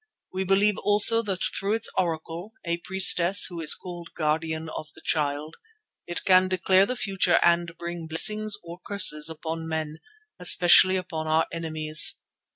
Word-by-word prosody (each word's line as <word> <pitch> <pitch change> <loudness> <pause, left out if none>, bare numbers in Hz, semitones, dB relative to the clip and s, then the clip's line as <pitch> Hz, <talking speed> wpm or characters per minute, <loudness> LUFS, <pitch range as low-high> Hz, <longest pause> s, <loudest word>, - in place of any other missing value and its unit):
We 190 0 -4
believe 200 +2 0
also 210 +2 +5
that 195 -4 -5
through 200 +2 -3
its 225 0 -2
Oracle—a 170 +1 -5
priestess 190 +1 +4
who 175 -2 -7
is 155 - +3
called 175 -2 -11
Guardian 160 0 -4
of 155 -1 -9
the 160 - -12
Child—it 160 - -7
can 185 -1 +3
declare 185 +1 0
the 250 - -4
future 195 -6 -1
and 170 0 -1
bring 170 -1 -8
blessings 210 +6 +1
or 170 +1 -12
curses 165 -7 0
upon 160 0 -8
men, 160 -1 -6 0.4
especially 180 +1 +5
upon 165 -4 -6
our 160 +1 0
enemies. 155 -2 +2
175 Hz, 145 wpm, -23 LUFS, 160-190 Hz, 0.4 s, also